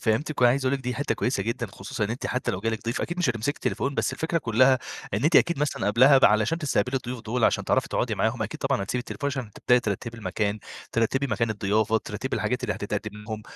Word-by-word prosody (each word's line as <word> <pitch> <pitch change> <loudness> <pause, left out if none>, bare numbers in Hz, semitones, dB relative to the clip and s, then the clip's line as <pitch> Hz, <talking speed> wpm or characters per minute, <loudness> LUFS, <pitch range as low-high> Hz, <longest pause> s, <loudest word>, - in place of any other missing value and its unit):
فهمتِك 125 +7 0
وأنا 120 -1 +7
عايز 135 +2 0
اقول 130 - +2
لِك - - -11
دي 125 - -1
حتة 145 - -1
كويسة 120 -5 -1
جدًا، 115 +3 -2
خصوصًا 105 +5 -4
إن 105 - -3
أنتِ 120 - -3
حتى 125 - -1
لو 90 - -4
جالِك 110 +1 -2
ضيف 115 +1 -2
أكيد 175 +1 -3
مش 175 -8 +2
هتمسكي 115 +5 -2
التليفون، 140 0 -2
بس 135 - 0
الفكرة 160 +5 -1
كلّها 130 0 +4 0.4
إن 105 - -1
أنتِ 160 +2 +5
أكيد 170 -4 +4
مثلًا 150 -1 -1
قبلها 135 +5 +6
ب - - +4
علشان 110 +9 +3
تستقبلي 135 -5 0
الضيوف 125 -1 -4
دول، 115 +1 -1
عشان - - +2
تعرفي - - +1
تقعُدي - - -1
معاهم - - 0
أكيد - - -5
طبعًا - - 0
هتسيبي 120 +5 -2
التليفون، 135 +3 -5
عشان 130 -5 -4
تبدأي 125 +4 +3
ترتِّبي 115 +2 -4
المكان 105 +1 -1 0.3
ترتِّبي 125 +4 +1
مكان 115 -3 0
الضيافة، 110 +1 +1
ترتِّبي - - -4
الحاجات - - -1
اللي - - -1
هتتقدِّم 105 - -4
لهم، 110 -1 -5
120 Hz, 235 wpm, -26 LUFS, 110-135 Hz, 0.4 s, وأنا